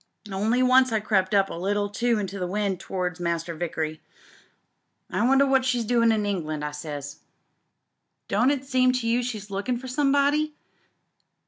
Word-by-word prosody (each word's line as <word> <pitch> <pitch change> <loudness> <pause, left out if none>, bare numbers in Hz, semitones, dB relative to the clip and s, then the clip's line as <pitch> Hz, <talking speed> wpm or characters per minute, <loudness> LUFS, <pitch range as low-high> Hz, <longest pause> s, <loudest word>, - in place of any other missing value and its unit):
Only 220 +6 +1
once 255 0 +5
I 220 - +2
crept 200 -2 +1
up 195 -1 +3
a - - -5
little 205 +4 -1 0.2
into 210 -5 0
the 180 - -2
wind 195 -1 -1
towards 180 -2 -3
Master 170 -1 -2
Vickery. 160 -2 -4 1.1
*I - - 0
wonder 270 +1 +5
what 265 -1 +3
she's 245 -3 0
doin' 230 0 +3
in 215 -2 0
England,' 155 -7 -2
I 150 - -3
says. 145 -1 -7 0.6
* - - -54
Don't 225 +6 +2
it 280 -2 -1
seem 255 -1 +3
to 250 -2 -1
you 235 +2 +2
she's 215 -5 -5
lookin' 205 +6 -2
for 260 +2 -8
somebody 285 +3 +1
210 Hz, 165 wpm, -25 LUFS, 180-255 Hz, 1.1 s, once